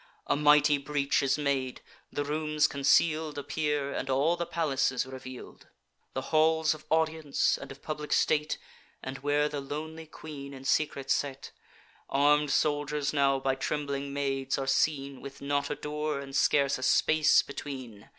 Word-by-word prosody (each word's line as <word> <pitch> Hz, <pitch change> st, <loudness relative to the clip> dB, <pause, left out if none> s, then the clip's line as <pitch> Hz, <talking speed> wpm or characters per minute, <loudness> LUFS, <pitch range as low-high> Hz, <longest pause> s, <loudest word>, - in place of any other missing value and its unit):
A -, -, +1 dB
mighty 150 Hz, 0 st, +5 dB
breach 140 Hz, +1 st, 0 dB
is 135 Hz, +1 st, +1 dB
made: 135 Hz, -3 st, -1 dB, 0.3 s
the 145 Hz, -, -2 dB
rooms 150 Hz, 0 st, +1 dB
conceal'd 155 Hz, +2 st, +2 dB
Appear, 145 Hz, 0 st, -1 dB
and 135 Hz, -, -4 dB
all 140 Hz, +6 st, +2 dB
the 170 Hz, -1 st, -3 dB
palace 140 Hz, -6 st, +1 dB
is 125 Hz, -1 st, -1 dB
reveal'd; 130 Hz, -1 st, -10 dB, 0.5 s
The 130 Hz, -, -1 dB
halls 160 Hz, 0 st, +4 dB
of 155 Hz, 0 st, -12 dB
audience, 160 Hz, -2 st, +1 dB
and -, -, -9 dB
of 135 Hz, -, -12 dB
public 150 Hz, -1 st, -5 dB
state, 150 Hz, 0 st, +2 dB, 0.5 s
And 135 Hz, +1 st, -5 dB
where 145 Hz, +2 st, +1 dB
the 145 Hz, -1 st, -4 dB
lonely 160 Hz, +3 st, -6 dB
queen 140 Hz, -3 st, -9 dB
in 135 Hz, 0 st, -11 dB
secret 140 Hz, -1 st, 0 dB
sate. 140 Hz, -1 st, -1 dB, 0.6 s
Arm'd 145 Hz, +1 st, +3 dB
soldiers 145 Hz, 0 st, 0 dB
now 140 Hz, -2 st, +3 dB
by 135 Hz, 0 st, 0 dB
trembling 140 Hz, 0 st, -3 dB
maids 135 Hz, -1 st, -1 dB
are 135 Hz, -, -2 dB
seen, 135 Hz, 0 st, 0 dB
With 140 Hz, 0 st, -9 dB
not 140 Hz, 0 st, -1 dB
a 150 Hz, -, -2 dB
door, 150 Hz, 0 st, -3 dB
and 135 Hz, -1 st, -8 dB
scarce 140 Hz, -2 st, +3 dB
a -, -, -8 dB
space, 155 Hz, +4 st, +4 dB
between. 130 Hz, -7 st, -8 dB
145 Hz, 160 wpm, -29 LUFS, 135-150 Hz, 0.6 s, mighty